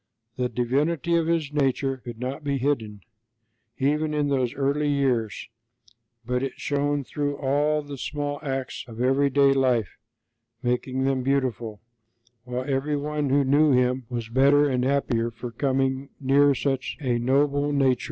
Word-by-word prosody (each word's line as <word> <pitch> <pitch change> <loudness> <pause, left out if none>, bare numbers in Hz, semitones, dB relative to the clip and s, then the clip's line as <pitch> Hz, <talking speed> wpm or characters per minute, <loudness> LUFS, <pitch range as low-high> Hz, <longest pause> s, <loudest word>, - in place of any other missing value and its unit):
The 125 0 -1
divinity 145 +8 0
of 165 -1 +2
His 160 -3 0
nature 135 -1 0
could 120 -2 -9
not 130 +4 -4
be 140 -1 0
hidden, 115 -7 -2 0.8
even 150 +3 0
in 145 -1 +1
those 130 -2 0
early 140 +2 0
years, 130 -6 0 0.8
but 125 +1 -1
it 135 -1 -3
shone 145 0 0
through 145 +1 -3
all 150 +2 +1
the 145 -2 -8
small 145 +1 -3
acts 135 -3 -4
of 115 -1 -10
everyday 135 +2 +3
life, 125 -7 +1 0.6
making 125 +2 -1
them 135 -1 +1
beautiful; 125 -5 -1 0.6
while 125 +1 -3
every 140 +2 0
one 150 0 -2
who 140 +1 +3
knew 145 +2 +4
Him 125 -1 +1
was 120 -2 -4
better 140 +5 +4
and 125 -2 0
happier 130 -4 +1
for 120 +1 -8
coming 135 +2 -1
near 140 +1 +4
such 135 +2 -2
a 125 -5 0
noble 145 +3 +2
nature. 135 -3 +2
135 Hz, 150 wpm, -25 LUFS, 125-145 Hz, 0.8 s, knew